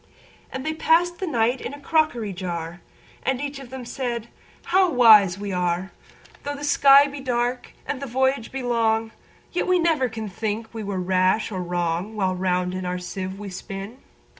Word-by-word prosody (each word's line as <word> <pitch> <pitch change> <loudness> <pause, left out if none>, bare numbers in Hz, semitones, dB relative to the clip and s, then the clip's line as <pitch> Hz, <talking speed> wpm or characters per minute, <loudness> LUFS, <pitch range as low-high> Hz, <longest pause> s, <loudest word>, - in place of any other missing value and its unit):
And 265 0 -5
they 315 - -1
pass'd 345 +2 +2
the 380 - -3
night 245 -3 +1
in 285 - -5
a - - -13
crockery 280 -9 0
jar; 175 -2 -5 0.4
And 265 -1 -1
each 285 0 -4
of 270 -3 -11
them 260 -1 -7
said, 235 -2 -4 0.3
"How 370 +1 +3
wise 215 - +7
we 200 0 -5
are! 180 +1 -1 0.5
Though 285 0 -4
the 285 - -8
sky 280 -1 +6
be 285 0 -6
dark, 245 -1 -2
and 280 - -4
the 275 - -4
voyage 265 0 0
be 265 -1 -4
long, 225 -2 +1 0.4
Yet 355 - -1
we 365 0 +4
never 320 -7 +2
can 220 -1 -5
think 220 +3 -4
we 225 - -5
were 200 -2 -3
rash 185 +4 +1
or 185 -2 -3
wrong, 175 +3 -2
While 190 -3 0
round 180 0 0
in 185 0 -4
our 180 0 -2
sieve 185 +1 -5
we 205 0 -7
spin." 195 +5 -7
225 Hz, 190 wpm, -24 LUFS, 190-275 Hz, 0.5 s, wise